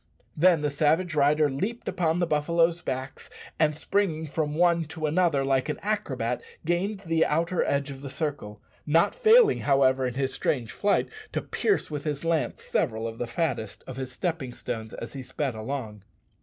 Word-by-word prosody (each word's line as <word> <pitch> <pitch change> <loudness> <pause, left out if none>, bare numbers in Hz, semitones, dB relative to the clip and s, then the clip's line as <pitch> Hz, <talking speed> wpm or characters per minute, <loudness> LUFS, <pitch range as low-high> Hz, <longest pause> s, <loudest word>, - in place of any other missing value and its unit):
Then 165 -1 +4
the 150 - +1
savage 160 +4 +2
rider 150 +1 +4
leaped 195 - -3
upon 170 -3 +1
the 175 - +2
buffaloes' 165 +2 +2
backs, 130 -2 -5 0.3
and 155 -1 +2
springing 160 -2 0
from 150 0 -2
one 170 0 +3
to 160 0 -5
another, 155 -3 +2
like 135 +1 +1
an 150 - -2
acrobat, 210 +1 -1 0.2
gained 190 +4 0
the 165 -3 +2
outer 165 +3 +1
edge 140 0 0
of 135 -1 -9
the 140 - -6
circle; 135 -9 -4 0.2
not 165 +3 +4
failing, 460 -2 +5
however, 135 -2 +3
in 125 - -5
his 135 0 -1
strange 120 -6 -1
flight, 205 -1 +1 0.3
to - - 0
pierce 415 - 0
with 145 -1 -4
his 150 0 -3
lance 160 -7 0
several 110 +1 -1
of 115 0 -7
the 120 - -2
fattest 120 - -2
of 130 - -8
his 130 -1 -4
stepping 140 -4 -3
stones 110 -1 -5
as 115 - -7
he 135 - -6
sped 130 +1 -3
along. 110 -2 -5
150 Hz, 180 wpm, -27 LUFS, 135-170 Hz, 0.3 s, failing